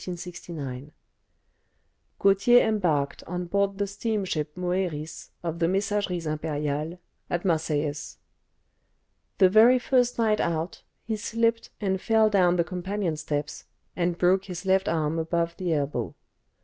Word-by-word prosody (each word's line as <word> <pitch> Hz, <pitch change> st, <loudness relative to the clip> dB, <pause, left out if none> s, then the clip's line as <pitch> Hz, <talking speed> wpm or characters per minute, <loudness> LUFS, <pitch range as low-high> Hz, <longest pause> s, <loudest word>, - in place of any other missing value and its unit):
Gautier 200 Hz, +5 st, +5 dB
embarked 165 Hz, -10 st, 0 dB
on 180 Hz, +1 st, -4 dB
board 200 Hz, +2 st, 0 dB
the 200 Hz, -, 0 dB
steamship 190 Hz, -7 st, -3 dB
"Moeris," 175 Hz, -4 st, -3 dB
of 170 Hz, -1 st, -3 dB
the 165 Hz, -, +2 dB
Messageries 195 Hz, -2 st, -1 dB
Impériales, 150 Hz, +1 st, -2 dB, 0.3 s
at 175 Hz, +1 st, -2 dB
Marseilles. 155 Hz, -3 st, -1 dB, 1.2 s
The 190 Hz, -, +7 dB
very 220 Hz, +6 st, +6 dB
first 245 Hz, -1 st, +1 dB
night 220 Hz, -2 st, +2 dB
out 165 Hz, +1 st, -2 dB, 0.2 s
he 225 Hz, -, -2 dB
slipped 230 Hz, +1 st, 0 dB
and 190 Hz, -2 st, -1 dB
fell 220 Hz, -1 st, +3 dB
down 180 Hz, -3 st, +4 dB
the 170 Hz, -, +2 dB
companion 180 Hz, 0 st, -3 dB
steps, 150 Hz, -1 st, -4 dB, 0.3 s
and 175 Hz, -1 st, 0 dB
broke 185 Hz, +2 st, +3 dB
his 180 Hz, 0 st, -7 dB
left 190 Hz, 0 st, +2 dB
arm 160 Hz, 0 st, 0 dB
above 170 Hz, +1 st, -1 dB
the 180 Hz, -2 st, -2 dB
elbow. 145 Hz, -2 st, -1 dB
180 Hz, 125 wpm, -26 LUFS, 160-200 Hz, 1.2 s, The